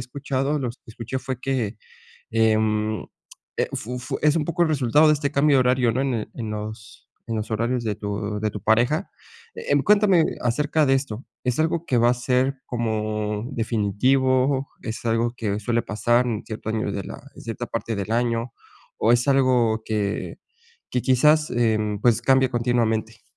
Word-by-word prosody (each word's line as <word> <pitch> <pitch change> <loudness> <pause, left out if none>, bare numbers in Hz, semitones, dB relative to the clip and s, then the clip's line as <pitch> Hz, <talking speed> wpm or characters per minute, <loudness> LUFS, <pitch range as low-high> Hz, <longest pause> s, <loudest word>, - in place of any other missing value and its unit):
escuchado, 135 +3 -2
lo 130 -4 -2
que 120 - -13
escuché 120 +3 -5
fue 130 -2 -4
que, 125 -6 -2 0.5
em, 110 -1 +1 0.5
e - - +1
fu 125 +3 -5
fu 125 - -6
-es 150 +1 +4
un 155 - +1
poco 170 +2 0
el 165 - +3
resultado 150 +1 +4
de 150 - +6
este 145 0 -2
cambio 140 0 +4
de - - +5
horario, 125 -1 +3
¿no? 130 - -1
En 120 -6 -2
en 115 -3 -5
los 105 +1 -8 0.2
en 115 - -3
los 110 +1 -4
horarios 115 +3 0
de 110 -2 -2
tu 105 0 -3
de 110 - 0
tu 105 - -6
pareja. 120 +8 +2 0.5
Eh, 465 +2 -1
cuéntame 200 -5 +4 0.2
acerca 150 +5 +1
de 135 - +4
esto, 130 -3 -3 0.2
¿es 125 -1 -1
algo 160 +1 0
que 125 - +1
va 120 +1 +4
a - - +2
ser 125 +2 0
como 110 -2 -2
definitivo? 130 +5 +1
¿Es 110 +1 -6
algo 115 +1 +1
que 105 -3 -2
suele 115 +2 0
pasar 120 +3 +1
en 110 -2 -3
cierto 110 0 -6
año 110 -2 -1
de 100 - -3
la - - -9
en - - -13
cierta - - -5
parte 115 -2 -3
del 100 +3 -3
año 115 0 0 0.5
o 115 - +2
es 120 +3 +2
algo 125 -5 +3
que 105 -2 -2 0.5
que 125 - -1
quizás, 150 +4 +4
em, 110 -3 +1
pues, 120 0 +3
cambia 130 -1 +3
continuamente? 115 -2 0
120 Hz, 180 wpm, -23 LUFS, 110-135 Hz, 0.5 s, de